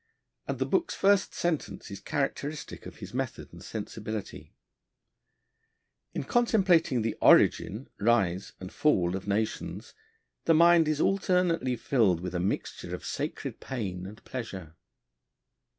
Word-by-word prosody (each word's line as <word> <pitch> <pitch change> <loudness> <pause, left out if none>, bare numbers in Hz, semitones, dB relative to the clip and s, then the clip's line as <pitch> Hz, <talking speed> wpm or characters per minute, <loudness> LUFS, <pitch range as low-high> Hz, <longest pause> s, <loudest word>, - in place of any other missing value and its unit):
and - - -2
the - - 0
book's 345 - 0
first 195 0 +3
sentence 160 -9 -2
is 100 - -6
characteristic 145 +3 -3
of - - -10
his 100 0 -10
method 130 -1 -4
and - - -11
sensibility: 110 -2 -6 1.6
'In - - -1
contemplating 185 - +3
the 115 - -1
origin, 110 +7 +4
rise, 100 -5 +1
and 95 0 -8
fall 90 - +2
of 95 +1 -6
nations, 110 +2 -2 0.5
the 165 - +5
mind 170 0 +6
is 155 -1 0
alternately 180 -9 +2
filled 110 -8 +2
with 90 +1 -5
a 90 - -1
mixture 95 +3 -3
of - - -10
sacred - - -4
pain 95 -8 -4
and 105 +2 -12
pleasure.' 95 -10 -6
120 Hz, 130 wpm, -29 LUFS, 95-165 Hz, 1.6 s, mind